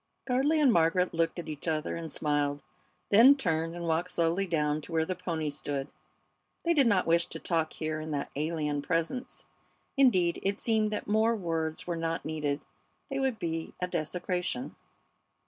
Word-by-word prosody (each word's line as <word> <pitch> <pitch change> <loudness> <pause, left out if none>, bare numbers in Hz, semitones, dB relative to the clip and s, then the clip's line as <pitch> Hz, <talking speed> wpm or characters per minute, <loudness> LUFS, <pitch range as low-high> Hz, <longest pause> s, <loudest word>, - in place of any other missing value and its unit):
Gardley 275 +5 +2
and 275 -6 +5
Margaret 170 +2 +3
looked 165 +1 0
at 175 - -5
each 155 +1 -6
other 155 -1 -1
and 165 -1 -5
smiled, 145 -1 0 0.5
then 235 +7 +8
turned 165 - -1
and 170 -1 -4
walked 165 +2 0
slowly 170 +3 +1
down 150 -3 0
to 160 - -11
where 160 -1 +2
the 185 - -2
pony 165 -4 -3
stood. 140 -1 -4 0.8
They 340 - +4
did 280 -6 +4
not 200 -5 +3
wish 170 +1 +3
to - - -5
talk 165 -2 -1
here 155 -1 -3
in 155 0 -6
that 145 -2 -3
alien 150 -1 -1
presence. 165 - -2 0.5
Indeed, 185 -11 +4
it 200 +1 -1
seemed 220 -2 +2
that 210 - -3
more 220 +2 +3
words 165 -5 -2
were 175 - -2
not 165 0 -2
needed 150 -2 -2 0.5
they - - -1
would 265 -4 0
be 165 -4 -4
a 180 - 0
desecration. 180 - -2
165 Hz, 175 wpm, -29 LUFS, 155-200 Hz, 0.8 s, then